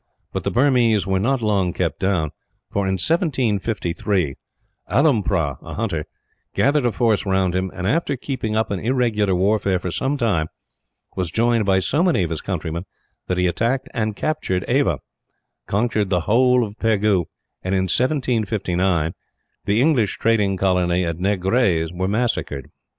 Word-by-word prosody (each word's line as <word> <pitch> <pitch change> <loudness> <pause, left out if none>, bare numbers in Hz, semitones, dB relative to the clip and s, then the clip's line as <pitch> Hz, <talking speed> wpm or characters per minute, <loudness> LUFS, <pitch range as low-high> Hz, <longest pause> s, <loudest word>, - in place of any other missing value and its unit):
But - - -2
the - - 0
Burmese 120 -5 +3
were 95 -1 +1
not 120 +4 0
long 100 -5 +1
kept 85 -4 -2
down 90 -6 0 0.4
for, 100 -1 0
in 95 - +1
1753, 105 - 0 0.6
Alompra 100 - +2
a - - -8
hunter 95 -9 -2 0.5
gathered 140 -2 +3
a - - +1
force 110 0 +1
round 95 -2 +1
him 95 +1 -1
and, 90 - -5
after 140 - 0
keeping 120 -5 -3
up 110 -1 0
an 100 - -1
irregular 110 -5 +1
warfare 100 0 +2
for 90 0 -4
some 135 +10 -1
time, 100 - +1 0.7
was 90 -3 -1
joined 115 +3 +2
by 95 -1 +4
so 130 - +1
many 175 - +3
of 85 - -3
his 80 - -3
countrymen 85 -2 -4 0.4
that 90 - -1
he 90 - +2
attacked 115 +9 0
and 110 -3 -1
captured 100 - -1
Ava, - - +1 0.7
conquered 105 -1 0
the 90 -2 +1
whole 125 +6 +3
of 105 -1 -7
Pegu 105 -5 +2 0.4
and, 95 +1 0
in 95 - +2
1759, 95 - 0 0.5
the 105 +2 +2
English 130 -8 +2
trading 105 -4 +2
colony 90 -1 +1
at 85 0 -3
Negrais 95 -3 +1
were 95 +1 -1
massacred. 100 - -2
100 Hz, 155 wpm, -21 LUFS, 90-120 Hz, 0.7 s, by